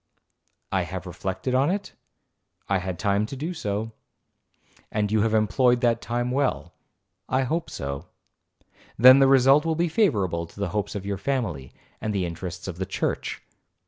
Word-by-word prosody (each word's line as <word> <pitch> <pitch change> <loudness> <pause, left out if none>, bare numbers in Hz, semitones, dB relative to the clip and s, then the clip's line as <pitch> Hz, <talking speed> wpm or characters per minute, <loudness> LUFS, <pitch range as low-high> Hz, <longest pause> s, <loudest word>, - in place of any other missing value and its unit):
'I - - +2
have - - -5
reflected 95 +7 -4
on 135 +4 +3
it?—'I 180 - -6
had 90 -1 -4
time 100 +3 +1
to 135 - -7
do 155 +7 -4
so.'—'And 105 - -6
you 110 -1 +3
have 110 0 +2
employed 120 +3 +3
that 115 -2 +2
time 120 +1 -2
well?'—'I 110 -4 -3
hope 165 +6 -2
so.'—'Then 105 - +1
the 135 - +6
result 135 +2 +6
will 165 -1 0
be 170 +1 +1
favourable 100 - +1
to 100 - -16
the 100 -2 -1
hopes 105 +3 -3
of 100 -1 -5
your 100 -1 -3
family, 100 - -2 0.3
and 110 -1 -2
the 95 -2 0
interests 90 +2 -6
of 90 -2 -6
the 95 - -2
church.' - - -3
110 Hz, 150 wpm, -25 LUFS, 95-135 Hz, 0.3 s, the